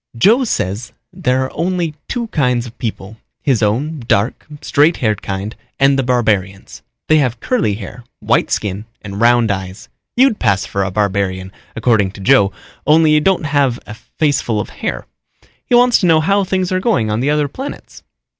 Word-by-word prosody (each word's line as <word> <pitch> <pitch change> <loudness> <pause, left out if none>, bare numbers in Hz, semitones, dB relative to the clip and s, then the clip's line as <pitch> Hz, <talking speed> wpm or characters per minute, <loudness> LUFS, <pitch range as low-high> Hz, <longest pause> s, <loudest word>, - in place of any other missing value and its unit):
"Joe 230 - +4
says 105 - -3 0.2
there 130 +1 0
are 130 - -7
only 170 -1 -1
two 240 -1 -2
kinds 125 - 0
of 120 - -11
people, 110 -2 -5 0.3
his 130 -6 +1
own 135 +9 0
dark, 100 +5 0 0.2
straight 150 +3 +3
haired 110 -4 -1
kind 100 +3 -5 0.2
and 135 0 +5
the 135 - +1
barbarians. 110 -7 -1 0.3
They 155 0 +4
have 125 -4 0
curly 200 - 0
hair, 110 +4 -9 0.2
white - - +1
skin 105 0 -2 0.2
and 100 0 -6
round 120 -2 +4
eyes. 95 -1 -6 0.3
You'd 255 -4 +4
pass 95 -2 +1
for 100 +1 -2
a 95 - -2
barbarian, 95 -2 -1 0.2
according 110 -4 +1
to - - -12
Joe, 100 -3 +4 0.4
only 155 +1 +5
you 155 0 +4
don't 185 0 +1
have 140 -5 +1
a 105 - -8
faceful 120 0 -1
of 105 - -5
hair. - - -4 0.6
He 245 - +3
wants 245 0 +5
to 180 - +1
know 160 -2 +5
how 195 +5 +2
things 185 -1 -1
are 185 - +1
going 185 - +1
on 105 - 0
the 135 +4 0
other 150 -1 +1
planets." 265 - -8
125 Hz, 180 wpm, -17 LUFS, 105-155 Hz, 0.6 s, and